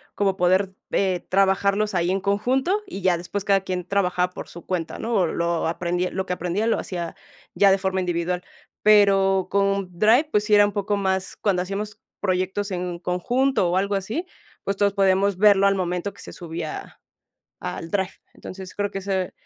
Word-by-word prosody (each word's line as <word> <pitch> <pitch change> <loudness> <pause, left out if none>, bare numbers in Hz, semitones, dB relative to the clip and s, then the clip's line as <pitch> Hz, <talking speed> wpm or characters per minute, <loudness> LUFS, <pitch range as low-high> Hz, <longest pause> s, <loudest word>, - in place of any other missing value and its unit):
como 195 -2 +1
poder, 185 +2 +2 0.2
eh, 185 -3 0
trabajarlos 195 +2 +2
ahí 175 0 +1
en 195 - +1
conjunto 260 - +1
y 270 - -7
ya 180 -2 +3
después 185 +3 -4
cada 195 -1 +3
quien 180 -2 -4
trabajaba 180 -2 +1
por - - -7
su 170 - -11
cuenta, 175 -3 -3
¿no?, 235 +1 -3
o 195 -5 +3
lo 170 0 -1
aprendi 175 +2 -1
lo 190 0 -3
que 180 - -2
aprendía 180 +5 -2
lo - - +2
hacía 170 -3 -5 0.4
ya 200 -1 +5
de 195 - +4
forma 190 -1 -1
individual. 180 0 -1 0.4
Pero 195 -3 +5
con 195 -1 +1
Drive, 240 - +4
pues 210 - +2
sí 210 - +1
era 205 - +7
un 205 - -1
poco 205 0 -1
más 190 -1 -1
cuando 190 -4 +1
hacíamos 210 +3 -5 0.2
proyectos 190 +1 -1
en 180 -1 -3
conjunto 195 +4 +1
o 180 - +1
algo 200 +1 0
así, 220 - -3 0.4
pues, 200 0 -2
todos 200 -1 +2
podíamos 195 0 +2
verlo 200 -1 +5
al 195 - +3
momento 180 +1 -2
que - - -14
se - - -9
subía 165 -2 -7 0.6
al 165 - -5
drive. 190 -1 -1 0.2
Entonces, 185 0 -9
creo 205 0 -1
que 195 - -4
ese, 190 -1 -2
195 Hz, 190 wpm, -23 LUFS, 180-200 Hz, 0.6 s, era